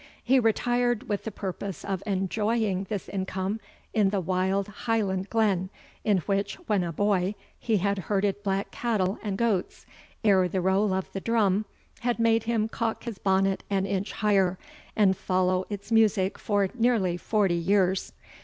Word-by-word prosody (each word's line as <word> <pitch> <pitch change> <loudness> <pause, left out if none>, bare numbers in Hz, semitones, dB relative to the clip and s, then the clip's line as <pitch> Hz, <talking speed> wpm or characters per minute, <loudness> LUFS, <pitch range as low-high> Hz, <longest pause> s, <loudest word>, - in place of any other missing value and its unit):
He 260 +2 +4
retired 240 +1 +1
with 205 -1 -2
the 220 - -3
purpose 195 -1 -5
of 195 -2 -2
enjoying 200 +1 0
this 205 -3 -3
income 190 +2 -3 0.3
in 210 -4 +3
the 200 0 0
wild 190 +2 0
Highland 205 -3 -1
glen, 200 -5 +1 0.3
in 210 -3 +3
which, 200 0 0
when 205 - +1
a 170 - -3
boy, 195 +2 +1 0.2
he 225 -3 +1
had 200 +1 0
herded 200 +2 0
black 195 -1 -1
cattle 210 -5 -1
and 205 -3 -3
goats, 215 -5 -1 0.4
ere 190 -4 +4
the 185 +2 -1
roll 190 +3 +2
of 190 0 -2
the 195 - -4
drum 215 -3 +2 0.3
had 245 0 0
made 230 -1 +2
him 225 -2 +1
cock 225 0 -3
his 230 -4 -6
bonnet 195 0 +1
an 195 -1 +1
inch 200 +1 -2
higher, 195 -3 +2 0.4
and 200 -3 +4
follow 185 0 0
its 205 +1 -7
music 210 -4 +3
for 205 -2 +1
nearly 230 -7 +2
forty 195 +1 +1
years. 185 +2 +1
200 Hz, 160 wpm, -27 LUFS, 190-220 Hz, 0.4 s, He